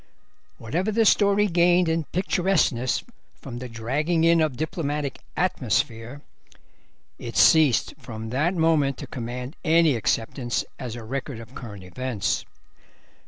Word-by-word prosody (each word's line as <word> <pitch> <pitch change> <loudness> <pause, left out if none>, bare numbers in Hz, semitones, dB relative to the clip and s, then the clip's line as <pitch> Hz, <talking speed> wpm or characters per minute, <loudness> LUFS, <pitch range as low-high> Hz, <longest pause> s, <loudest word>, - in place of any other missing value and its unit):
Whatever 170 - -2
the 225 +1 +2
story 200 0 +4
gained 175 -1 +3
in 160 -1 0
picturesqueness 175 -9 +1 0.4
from 120 -3 -7
the 125 0 -7
dragging 145 +9 -1
in 165 0 +5
of 150 -6 0
diplomatic 150 -3 -3 0.2
"atmosphere," 130 - -1 1.0
it 120 -1 -6
ceased 155 -7 +5
from 110 -1 -7
that 155 +9 +1
moment 160 -5 +2
to - - -7
command 125 +4 -6
any 165 -3 +4
acceptance 120 +2 -1
as 120 -3 -5
a 120 - -8
record 135 +1 -5
of 115 +2 -12
current 105 -8 -9
events. 120 +3 -2
140 Hz, 125 wpm, -24 LUFS, 120-165 Hz, 1.0 s, in